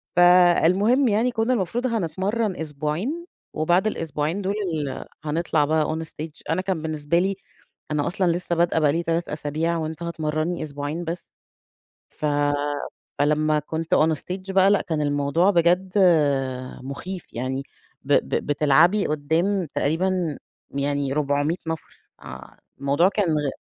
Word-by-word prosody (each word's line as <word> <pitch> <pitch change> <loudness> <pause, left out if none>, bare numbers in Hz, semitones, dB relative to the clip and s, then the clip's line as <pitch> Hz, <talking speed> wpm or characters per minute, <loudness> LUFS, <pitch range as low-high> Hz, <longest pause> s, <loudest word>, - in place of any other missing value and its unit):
فالمهم 180 +8 +5
يعني 225 +4 +2
كنا 230 +2 +1
المفروض 235 +4 -1
هنتمرن 200 +1 -1
أسبوعين 160 - -3 0.3
وبعد 175 +6 +2
الأسبوعين 160 0 -2
دول 195 +1 -1 0.2
ال 145 -4 -3 0.2
هنطلع 155 -1 +1
بقى 155 0 +2
on 160 - -3
stage، 155 +2 -8
أنا 165 +3 +1
كان 185 -4 -2
بالنسبة 155 +1 0
لي 195 +2 0 0.6
أنا 150 -1 0
أصلًا 180 -1 +1
لسه 175 0 -1
بادئة 170 -1 +2
بقى 150 -2 +3
لي 170 +2 -1
3 165 +1 -1
أسابيع 155 +3 -1
وأنت 160 +1 -4
هتمرنّي 155 0 -2
أسبوعين 145 +3 -4
بس 170 +1 -6 0.8
ف 150 - -5 0.9
فلما 150 +1 +2
كنت 160 +2 -2
on 160 +1 +4
stage 185 +1 -5
بقى 190 +1 +5
لأ 205 - +3
كان 160 -3 -2
الموضوع 145 +5 +2
بجد 180 +1 +2 0.9
مخيف 170 +8 -7
يعني 130 +3 -2 0.4
ب - - -1
ب - - +1
بتلعبي 150 +7 +4
قدام 165 +6 0
تقريبًا 170 0 0 0.3
يعني 140 0 -1
400 145 +3 0
نفر 160 0 -6 0.2
آآ - - -11 0.2
الموضوع 140 +6 +3
كان 200 -1 0
غ 145 -2 -1
165 Hz, 135 wpm, -24 LUFS, 150-185 Hz, 0.9 s, فالمهم